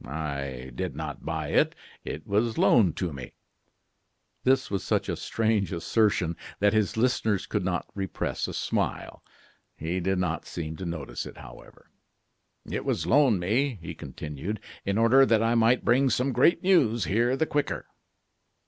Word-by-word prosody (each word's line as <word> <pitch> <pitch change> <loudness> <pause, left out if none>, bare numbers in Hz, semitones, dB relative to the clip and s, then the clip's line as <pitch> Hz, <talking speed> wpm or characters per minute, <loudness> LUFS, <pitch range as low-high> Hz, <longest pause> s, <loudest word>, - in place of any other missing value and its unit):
"I 70 -3 -5
did - - -4
not - - -6
buy - - -2
it; - - +2 0.3
it 75 - -6
was 110 +3 0
loaned 95 -9 +4
to 90 -5 -2
me." 65 -2 -8 1.1
This 130 -2 +2
was 100 - -1
such - - 0
a - - -1
strange 110 -3 0
assertion 90 -2 +1 0.2
that 105 +1 +3
his 110 +1 +1
listeners 110 -4 +1
could 105 -3 -2
not 90 -1 -1
repress 95 -2 -3
a - - -6
smile. - - -2 0.6
He 85 +4 -2
did 95 +1 0
not 90 -3 -2
seem 80 -2 -5
to 95 - -6
notice 80 -5 -5
it, - - -11
however. - - -14 0.8
"It - - -3
was - - -1
loaned 130 -7 +4
me," 120 +7 +1
he 80 - -7
continued, 75 +8 -6 0.3
"in 100 +1 0
order 115 +4 +6
that 115 -4 +3
I 115 +1 +2
might 115 +1 +3
bring 130 +3 +4
some 125 +3 +1
great 130 +11 +3
news 130 - +3
here 120 - +1
the 160 - +2
quicker." 145 -2 -2
105 Hz, 160 wpm, -27 LUFS, 85-120 Hz, 1.1 s, order